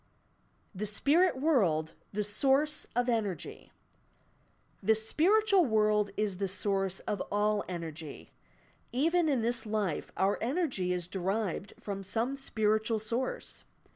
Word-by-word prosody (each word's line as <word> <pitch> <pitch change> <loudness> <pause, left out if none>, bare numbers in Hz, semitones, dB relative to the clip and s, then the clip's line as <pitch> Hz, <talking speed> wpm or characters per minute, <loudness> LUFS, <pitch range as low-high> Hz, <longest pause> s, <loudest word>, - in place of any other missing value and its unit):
THE 205 +2 -4
spmrr 285 - +3
world 180 - +2 0.2
the 210 +1 -1
source 275 +8 +1
op 245 0 +1
energy 210 -8 -2 1.1
The 220 +3 +4
spiritual 375 - +3
world 210 -3 +2
is 210 -3 -1
the 195 +1 -1
source 195 -1 0
of 205 - -3
all 210 0 +1
energy. 165 -4 -7 0.6
Even 325 +6 +2
in 260 -6 +1
this 235 +1 +1
life 210 -7 -2
our 195 +2 +2
energy 255 - 0
is 180 -1 -1
derived 195 +1 -2
from 200 -1 -5
some 230 +7 -1
spiritual 220 -4 0
source. 235 - -3
215 Hz, 120 wpm, -31 LUFS, 195-260 Hz, 1.1 s, The